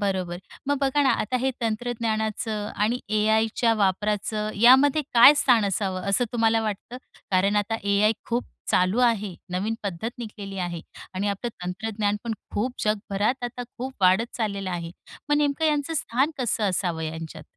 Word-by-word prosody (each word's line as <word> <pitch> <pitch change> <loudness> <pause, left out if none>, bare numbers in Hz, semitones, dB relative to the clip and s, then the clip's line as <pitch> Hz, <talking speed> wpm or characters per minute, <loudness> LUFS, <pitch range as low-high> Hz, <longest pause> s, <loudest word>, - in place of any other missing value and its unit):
बरोबर. 185 -3 -2 0.3
मग 285 0 +1
बघा 275 +1 +2
ना, 270 - +4
आता 255 +4 0
हे 265 +1 +1
तंत्रज्ञानाचं 220 -2 -2
आणि 225 +4 0
ए-आयच्या 220 +2 +2
वापराचं, 210 +1 0
यामध्ये 265 +7 +6
काय 240 +5 +9
स्थान 240 -6 +4
असावं, 190 -1 -1
असं 245 +5 +3
तुम्हाला 225 -1 +2
वाटतं? 215 +3 -4 0.3
कारण 195 +2 +2
आता 205 +2 0
ए-आय 200 +2 +3 0.2
खूप 240 +1 0 0.3
चालू 185 +6 +2
आहे. 210 -6 +1 0.2
नवीन 200 +5 -1
पद्धत 200 +3 -3
निघलेली 200 -4 -7
आहे 175 -2 -3 0.3
आणि 200 +2 -1
आपलं 200 +4 -2 0.2
तंत्रज्ञानपण 210 +3 -2 0.2
खूप 245 +5 -1
जगभरात 215 +4 0
आता 245 +1 -5 0.2
खूप 260 +2 -4
वाढत 190 +6 +3
चाललेलं 200 -4 -2
आहे. 170 -1 -4 0.4
मग 295 - +3
नेमकं 295 +1 +1
यांचं 300 +1 0
स्थान 270 +1 0
कसं 235 -4 0
असावं 175 -3 -1
यांच्यात? 160 0 -6
215 Hz, 150 wpm, -25 LUFS, 195-240 Hz, 0.4 s, काय